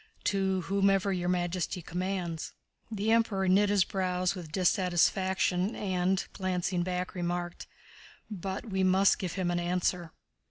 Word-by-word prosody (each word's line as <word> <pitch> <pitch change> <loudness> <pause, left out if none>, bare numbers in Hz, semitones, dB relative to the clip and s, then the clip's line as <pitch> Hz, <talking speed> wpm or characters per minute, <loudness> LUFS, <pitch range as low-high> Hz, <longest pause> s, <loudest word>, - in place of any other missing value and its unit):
"To 190 -1 +1
whomever 195 +1 +2
Your 175 -1 -1
Majesty 180 0 -1
commands." 180 -2 -3 0.4
The 215 0 -1
Emperor 220 -4 +2
knit 200 +2 +4
his 200 -2 +4
brows 185 -1 -1
with 175 -5 -8
dissatisfaction 185 +2 +1
and, 185 -1 0
glancing 185 -1 -1
back, 180 0 -2
remarked: 175 -1 -3 0.6
"But 195 +2 -5
we 190 -2 -1
must 190 +1 +4
give 180 -3 -3
him 185 -2 -1
an 175 - 0
answer." 175 -1 -1
185 Hz, 130 wpm, -30 LUFS, 175-195 Hz, 0.6 s, knit